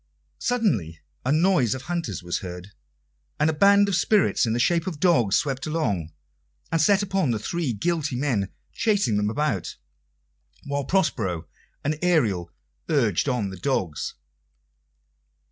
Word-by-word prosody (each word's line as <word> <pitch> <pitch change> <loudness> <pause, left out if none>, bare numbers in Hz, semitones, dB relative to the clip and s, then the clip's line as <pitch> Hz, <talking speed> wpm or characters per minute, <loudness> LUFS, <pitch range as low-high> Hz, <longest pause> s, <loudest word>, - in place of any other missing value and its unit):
Suddenly 120 - 0 0.2
a 130 - 0
noise 155 - +3
of 130 - -7
hunters 170 - -3
was 85 -1 -2
heard, 90 +1 -8 0.7
and 150 +2 +3
a - - -5
band 200 +5 +5
of 200 - -1
spirits 200 - +2
in 110 - 0
the 120 - 0
shape 170 +6 +2
of 165 -6 -4
dogs 125 - +3
swept 140 -2 -1
along, 105 - -1 0.6
and 165 -1 +2
set 200 +5 +4
upon 190 -6 0
the 115 - +1
three 155 +6 -2
guilty 150 +5 -1
men, 120 -8 0 0.2
chasing 200 - +1
them 105 0 +1
about, 115 - -1 0.9
while 140 -1 -2
Prospero 115 - 0 0.4
and 150 +1 -1
Ariel 110 - +1 0.4
urged 130 - +2
on 115 -7 -1
the 95 - -8
dogs. 95 - -2
140 Hz, 145 wpm, -25 LUFS, 105-170 Hz, 0.9 s, band